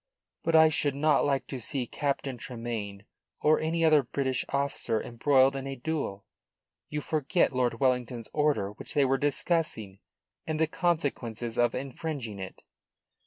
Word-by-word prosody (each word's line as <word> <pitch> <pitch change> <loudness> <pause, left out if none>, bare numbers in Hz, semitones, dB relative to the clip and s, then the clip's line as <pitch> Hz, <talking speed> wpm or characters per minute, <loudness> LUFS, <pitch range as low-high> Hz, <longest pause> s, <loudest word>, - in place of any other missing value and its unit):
"But 165 - +1
I 160 0 +8
should 145 -2 0
not 150 0 +3
like 140 -2 +1
to 130 - -6
see 130 +2 -2
Captain 140 +1 -2
Tremayne 115 -4 -5 0.3
or 155 +1 +4
any 165 +1 +1
other 155 -2 +6
British 130 0 -1
officer 140 -5 -1
embroiled 135 +2 +3
in 135 0 -4
a 135 - -4
duel. 125 -8 -3 0.6
You 150 0 -3
forget 155 +1 +1
Lord 125 -1 0
Wellington's 125 -3 0
order 150 -10 +1
which 105 - -8
they 145 -2 +4
were 135 0 +2
discussing, 145 - 0 0.5
and 155 -1 -1
the 160 - +4
consequences 140 - -1
of 120 -1 +3
infringing 130 -4 -5
it." 95 0 -8
135 Hz, 150 wpm, -29 LUFS, 120-150 Hz, 0.6 s, I